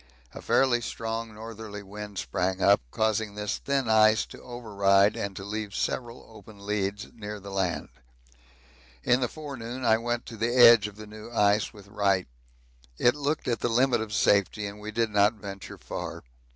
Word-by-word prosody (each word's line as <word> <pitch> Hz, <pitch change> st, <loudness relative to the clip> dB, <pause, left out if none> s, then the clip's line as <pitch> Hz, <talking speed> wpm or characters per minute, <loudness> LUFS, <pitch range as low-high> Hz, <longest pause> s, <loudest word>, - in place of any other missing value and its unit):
A -, -, -9 dB
fairly 125 Hz, -3 st, +3 dB
strong 115 Hz, 0 st, -4 dB
northerly 110 Hz, -2 st, -8 dB
wind 105 Hz, 0 st, -8 dB
sprang 95 Hz, +1 st, -1 dB
up, 100 Hz, +1 st, +5 dB
causing 110 Hz, -, 0 dB
this 105 Hz, -1 st, -3 dB
thin 135 Hz, -3 st, -1 dB
ice 110 Hz, -1 st, +5 dB
to -, -, -13 dB
override 100 Hz, -4 st, +2 dB
and 100 Hz, -1 st, -4 dB
to 95 Hz, -, -7 dB
leave 105 Hz, 0 st, -5 dB
several 120 Hz, -1 st, -3 dB
open 110 Hz, -1 st, -14 dB
leads 105 Hz, 0 st, -2 dB
near 105 Hz, -2 st, -7 dB
the 100 Hz, 0 st, -9 dB
land. 95 Hz, -3 st, -1 dB, 1.1 s
In 125 Hz, +1 st, +3 dB
the 125 Hz, -, 0 dB
forenoon 130 Hz, -4 st, -7 dB
I 110 Hz, -1 st, +4 dB
went 120 Hz, 0 st, -2 dB
to 115 Hz, -, -9 dB
the 120 Hz, +3 st, 0 dB
edge 115 Hz, -4 st, +8 dB
of 105 Hz, -, -11 dB
the 110 Hz, 0 st, -10 dB
new 105 Hz, +1 st, -11 dB
ice 105 Hz, -2 st, +2 dB
with 100 Hz, -3 st, -15 dB
Wright. 100 Hz, -2 st, +1 dB, 0.7 s
It 120 Hz, -, +4 dB
looked 150 Hz, +2 st, -2 dB
at 120 Hz, -3 st, 0 dB
the 120 Hz, -, 0 dB
limit 120 Hz, 0 st, +3 dB
of 110 Hz, -1 st, -5 dB
safety 105 Hz, 0 st, +2 dB
and 100 Hz, +1 st, -7 dB
we 105 Hz, +1 st, -7 dB
did 115 Hz, 0 st, 0 dB
not 105 Hz, +1 st, +4 dB
venture 100 Hz, -2 st, -9 dB
far. -, -, -6 dB
110 Hz, 180 wpm, -27 LUFS, 100-115 Hz, 1.1 s, edge